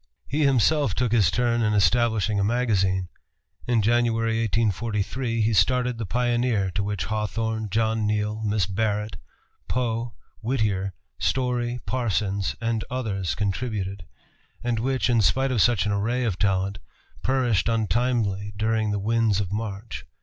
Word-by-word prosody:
He 150 +2 +1
himself 140 -2 +3
took 125 -3 0
his 105 -7 +4
turn 120 +4 +1
in 105 -1 +2
establishing 110 -1 +2
a - - +2
magazine. 100 -5 +1 0.6
In 120 -3 +2
January, 115 0 +2
1843, 115 +2 -1
he 110 +1 +2
started 125 +4 +2
The 110 - -3
Pioneer, 120 -2 +1
to 90 +3 -1
which 100 -4 -2
Hawthorne, 110 +2 -2
John 110 +1 +1
Neal, 105 +1 -1
Miss 105 -3 +1
Barrett, 105 +2 -2 0.5
Poe, 120 -1 -2 0.3
Whittier, 105 -6 -1 0.2
Story, 120 - 0
Parsons, 100 -5 -1
and 115 -1 -1
others 100 - -2
contributed, 100 -3 -3 0.6
and 120 -2 0
which, 130 +2 0
in 120 -3 +3
spite 130 +7 +2
of 120 -5 +2
such 120 -3 +3
an 105 - 0
array 115 +5 0
of 105 -6 -1
talent, 100 0 0 0.4
perished 120 - +1
untimely 110 -2 0
during 110 0 +1
the 105 - 0
winds 110 0 +1
of 100 -3 -3
March. 105 0 -5
110 Hz, 140 wpm, -25 LUFS, 100-120 Hz, 0.6 s, his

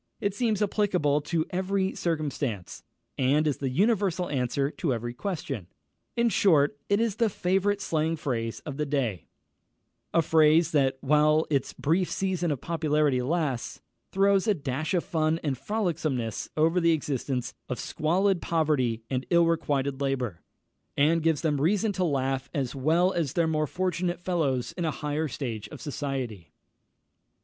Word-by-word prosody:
It 200 -1 -1
seems 215 -1 +1
applicable 180 -8 +1
to 160 +2 -1
every 190 +1 0
circumstance, 145 - -3 0.4
and 140 +4 +3
is 150 -3 +1
the 135 - -2
universal 190 - +1
answer 135 +1 0
to 145 -7 -1
every 120 +1 -4
question; 135 - -4 0.5
in 235 0 +3
short, 150 -10 +3
it 200 +1 +3
is 225 -3 0
the 230 -1 +3
favourite 195 +2 +1
slang 160 -3 0
phrase 115 -7 -3
of 140 -3 -7
the 150 - 0
day, 125 - -1 0.8
a 165 - +3
phrase 160 +1 +4
that, 135 -3 +2
while 150 +2 +3
its 140 -2 0
brief 170 +5 +1
season 185 -3 -1
of 145 -4 -1
popularity 150 -5 +1
lasts, 140 -3 -2 0.3
throws 195 +1 +3
a 210 - +3
dash 150 +4 -2
of 175 - +1
fun 160 0 0
and 145 -4 0
frolicsomeness 155 - -2
over 165 +3 +3
the 170 0 +4
existence 135 -4 -2 0.2
of 125 - -3
squalid 180 +3 +1
poverty 145 -9 0
and 130 -1 -3
ill 170 -1 +5
requited 140 -4 0
labour, 125 -9 -2 0.6
and 160 +4 +3
gives 160 -2 +1
them 150 -4 0
reason 205 +7 +2
to 185 -1 -1
laugh 135 -4 -1
as 135 -3 -1
well 165 +7 +2
as 155 -6 -1
their 170 - +2
more 155 -1 0
fortunate 180 +1 -1
fellows 145 -9 -1
in 175 - -4
a 160 - +1
higher 150 +1 -2
stage 115 -6 -5
of - - -10
society. 135 - -4
155 Hz, 155 wpm, -27 LUFS, 135-175 Hz, 0.8 s, ill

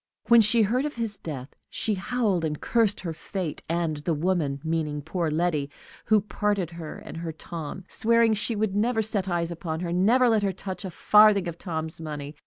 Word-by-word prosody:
When 235 -1 +8
she 220 +2 +4
heard 245 +6 +1
of 300 - -4
his 225 -3 -3
death, 145 -8 -6 0.2
she 220 - 0
howled 200 -2 0
and 150 -2 -2
cursed 225 -4 +1
her 170 -3 -4
fate, 170 -1 -5
and 165 -2 0
the 155 +2 -1
woman, 155 -4 0
meaning 155 -3 -2
poor 165 +1 -1
Letty, 155 -2 0 0.4
who 220 - +4
had 210 0 +1
parted 200 -2 -1
her 165 -2 -7
and - - -9
her 165 0 -4
Tom, 165 +2 -7
swearing 230 0 +3
she 215 +2 0
would 210 -2 -1
never 225 +2 +2
set 200 -3 -2
eyes 170 -1 -1
upon 165 -1 -4
her, 175 -1 -3
never 230 +8 +4
let 220 -2 +3
her 195 -2 0
touch 190 +1 -6
a - - -3
farthing 210 +1 +5
of 170 -1 -6
Tom's 160 -3 -4
money. 150 -2 -6
180 Hz, 200 wpm, -26 LUFS, 160-215 Hz, 0.4 s, When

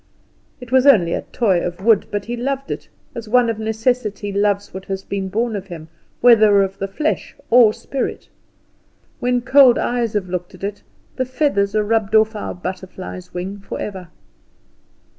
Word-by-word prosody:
It 250 -1 -11
was 260 +1 +4
only 180 -11 +5
a - - -1
toy 195 -7 0
of 175 0 -4
wood, 225 -3 +4
but 205 -1 -3
he 240 - -4
loved 275 +3 -3
it, - - -6 0.2
as 230 -2 -7
one 245 0 +4
of 220 - -6
necessity 220 -2 -1
loves 200 0 0
what 190 +1 -7
has 195 0 -4
been 195 -1 -4
born 225 +3 -1
of 195 -1 -6
him, 165 -3 -9 0.3
whether 215 -4 +6
of 195 0 -5
the 195 - -2
flesh 300 +11 -2 0.2
or 235 -2 +7
spirit. 265 +4 -4 0.9
When 245 0 +1
cold 260 -1 +6
eyes 240 -3 -1
have 205 -3 -1
looked 180 +1 -5
at 185 - -16
it, 205 +1 -4 0.4
the 260 - 0
feathers 250 -7 0
are 215 - +2
rubbed 220 0 0
off 220 0 +4
our 210 - -5
butterfly's 185 0 -7
wing 190 +3 -5
forever. 195 -2 -6
210 Hz, 175 wpm, -19 LUFS, 195-240 Hz, 0.9 s, or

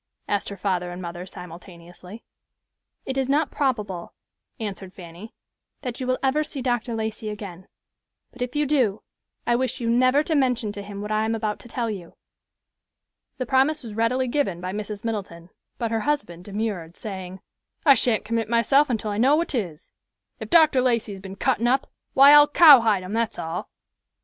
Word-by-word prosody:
asked 205 -1 -1
her 200 - -7
father 180 -2 -1
and 175 +1 -7
mother, 175 0 -7
simultaneously. 180 +3 -11 0.8
"It 265 0 -2
is 265 0 -1
not 290 +2 +1
probable," 210 -11 -2 0.4
answered 195 -3 -6
Fanny, 175 +4 -11 0.5
"that 250 -3 -5
you 255 - -4
will 255 0 +1
ever 280 +3 +2
see 295 -2 -7
Dr. 240 -2 -1
Lacey 220 0 -4
again, 195 -3 -8 0.6
but 250 - -14
if 250 +2 -3
you 295 0 +2
do, 255 -8 +1 0.4
I 240 - +2
wish 255 +1 -1
you 230 -1 0
never 255 +4 +4
to 320 - -2
mention 250 -7 +1
to 205 0 -7
him 200 0 -8
what 210 - -5
I 215 0 +1
am 225 +1 0
about 215 -2 -2
to - - -13
tell 235 -1 -2
you." 185 -5 -8 1.2
The 255 - -3
promise 270 +4 +2
was 225 -3 -8
readily 240 +4 +1
given 240 -9 -1
by 185 +1 -5
Mrs. 210 0 -6
Middleton, 190 -6 -5 0.3
but 230 -2 -2
her 225 - +1
husband 215 - -2
demurred, 200 -5 -4
saying, 190 -3 -7 0.5
"I 280 - +9
shan't 230 -4 +1
commit 225 0 -2
myself 250 +5 +3
until 220 -3 -2
I 205 - -2
know 270 +5 +5
what 335 +2 0
'tis. 185 - -4 0.5
If - - -7
Dr. 310 -6 +5
Lacey 235 -4 +1
has 195 -1 -8
been 195 0 -8
cuttin' 225 +4 +1
up, 265 +2 +1 0.3
why 275 +1 +8
I'll 295 0 +8
cowhide 240 - +7
him, 185 +3 -6
that's 230 0 -1
all." 165 +2 -5
225 Hz, 185 wpm, -24 LUFS, 195-255 Hz, 1.2 s, I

